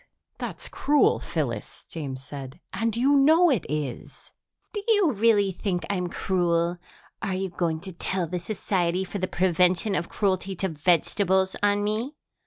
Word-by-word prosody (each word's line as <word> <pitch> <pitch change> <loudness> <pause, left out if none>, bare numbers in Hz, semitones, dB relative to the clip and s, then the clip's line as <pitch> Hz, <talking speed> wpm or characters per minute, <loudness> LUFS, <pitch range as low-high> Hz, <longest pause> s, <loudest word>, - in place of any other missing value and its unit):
"That's - - -5
cruel, 295 0 +3
Phyllis," - - -4
James 135 -5 -6
said, 135 +1 -8
"and 230 0 -1
you 275 +4 +4
know 315 +5 +6
it 235 -10 0
is." 150 -5 -5 0.4
"Do 415 - -3
you 410 -8 +4
really 205 -3 +3
think 180 -1 -2
I'm 180 -3 -1
cruel? 175 -1 0 0.4
Are 195 -4 -1
you 190 0 -2
going 165 -3 -1
to 190 - -7
tell 180 +1 -1
the 175 +2 -3
Society 180 -2 -1
for 200 +2 -5
the 185 - -1
Prevention 180 +2 +2
of 170 - -1
Cruelty 190 -1 0
to 190 +2 -1
Vegetables 185 +4 +1
on 205 0 +2
me? 220 +8 -2
190 Hz, 155 wpm, -26 LUFS, 170-210 Hz, 0.4 s, know